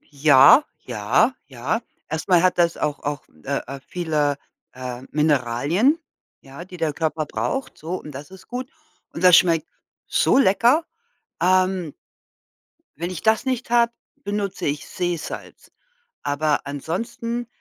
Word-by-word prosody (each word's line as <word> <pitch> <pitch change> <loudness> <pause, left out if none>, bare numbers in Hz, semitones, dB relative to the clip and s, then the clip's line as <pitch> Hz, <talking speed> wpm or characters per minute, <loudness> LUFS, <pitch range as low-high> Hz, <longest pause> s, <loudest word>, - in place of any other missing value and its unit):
ja, 145 - +6 0.2
ja, 125 - +2
ja. 140 - -2 0.3
Erst 160 +4 -4
mal 175 -2 +5
hat 185 -1 +2
das 170 -1 +3
auch 145 -1 -2
auch, 145 0 -3 0.2
äh, 140 0 -1
äh, 135 0 -7
viele, 150 -5 -1 0.3
äh, 125 -1 -7
Mineralien, 150 - +2 0.4
ja, 140 +5 -11
die 180 0 -11
der 160 -2 0
Körper 155 0 -2
braucht, 270 - -3
so 170 +4 -4
und 150 - -10
das 140 +2 -9
ist 190 - -14
gut. 250 +1 -5 0.4
Und 165 - -6
das 180 -2 +8
schmeckt 165 -3 +3 0.4
so - - +3
lecker. 245 - +4 0.6
Ähm 185 -3 +2 1.0
wenn 170 +3 -3
ich 180 -3 -6
das 220 +3 +3
nicht 255 -2 -2
habe, 235 -1 +4 0.3
benutze 205 -1 -3
ich 145 0 -3
Seesalz. 175 -3 -5 0.5
Aber 145 +1 0
ansonsten, 230 - -4
165 Hz, 135 wpm, -22 LUFS, 145-200 Hz, 1.0 s, das